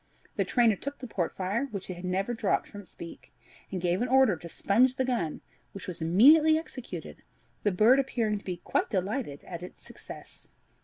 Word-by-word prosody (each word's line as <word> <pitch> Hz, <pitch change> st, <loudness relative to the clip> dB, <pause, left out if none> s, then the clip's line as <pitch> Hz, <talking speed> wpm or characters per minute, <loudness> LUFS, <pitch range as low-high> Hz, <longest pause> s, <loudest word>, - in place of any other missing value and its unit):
The -, -, +1 dB
trainer 235 Hz, -4 st, +3 dB
took 280 Hz, +8 st, -6 dB
the 255 Hz, -, -8 dB
port 185 Hz, -8 st, -3 dB
fire, 200 Hz, +8 st, -1 dB
which 200 Hz, -5 st, -6 dB
it 185 Hz, -, -4 dB
had 175 Hz, +1 st, -8 dB
never 195 Hz, +6 st, -1 dB
dropped 230 Hz, -, 0 dB
from 205 Hz, -, -9 dB
its 195 Hz, -, -21 dB
beak, 170 Hz, -, -10 dB, 0.4 s
and 190 Hz, -, -2 dB
gave 180 Hz, +2 st, 0 dB
an 245 Hz, -, +1 dB
order 260 Hz, -5 st, +5 dB
to 170 Hz, +1 st, -10 dB
sponge 245 Hz, +9 st, +2 dB
the 260 Hz, -, 0 dB
gun, 230 Hz, -12 st, -2 dB, 0.3 s
which 195 Hz, 0 st, -8 dB
was 175 Hz, -2 st, -5 dB
immediately 295 Hz, -, +6 dB
executed, 280 Hz, -6 st, -7 dB, 0.4 s
the 205 Hz, -, +1 dB
bird 220 Hz, +8 st, +5 dB
appearing 225 Hz, -6 st, 0 dB
to -, -, -19 dB
be 180 Hz, -2 st, -3 dB
quite 175 Hz, -, -1 dB
delighted 195 Hz, -, -2 dB
at 170 Hz, -2 st, -7 dB
its 180 Hz, -, -10 dB
success. -, -, -11 dB
205 Hz, 200 wpm, -28 LUFS, 180-255 Hz, 0.4 s, immediately